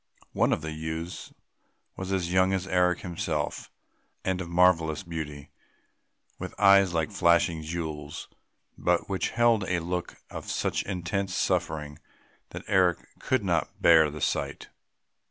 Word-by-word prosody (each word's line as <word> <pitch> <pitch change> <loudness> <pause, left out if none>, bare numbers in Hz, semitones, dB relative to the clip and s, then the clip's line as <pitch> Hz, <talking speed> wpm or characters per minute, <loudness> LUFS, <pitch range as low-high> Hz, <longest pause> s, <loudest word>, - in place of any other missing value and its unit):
One - - +2
of - - 0
the 80 - -4
youths 80 +2 -5 0.6
was 95 0 -5
as 90 -2 -1
young 95 +1 +4
as 95 -1 -1
Eric 90 -1 +2
himself 80 -4 -3 0.6
and 95 -1 0
of 85 - -6
marvellous 85 -3 +3
beauty, 75 -5 -6 0.9
with - - -7
eyes 100 -2 +6
like 80 -2 -1
flashing 85 -1 +3
jewels, 80 -2 -5 0.5
but 90 -1 +1
which 95 -1 -1
held 115 -2 +3
a 90 -1 0
look 90 +1 -4 0.2
of - - -7
such - - -1
intense 95 +1 -2
suffering 75 -1 -1 0.5
that - - -8
Eric 90 -3 +3 0.2
could 130 -4 0
not 85 -4 -1
bear 80 -2 +6
the 75 0 -8
sight. - - -2
85 Hz, 135 wpm, -27 LUFS, 80-95 Hz, 0.9 s, eyes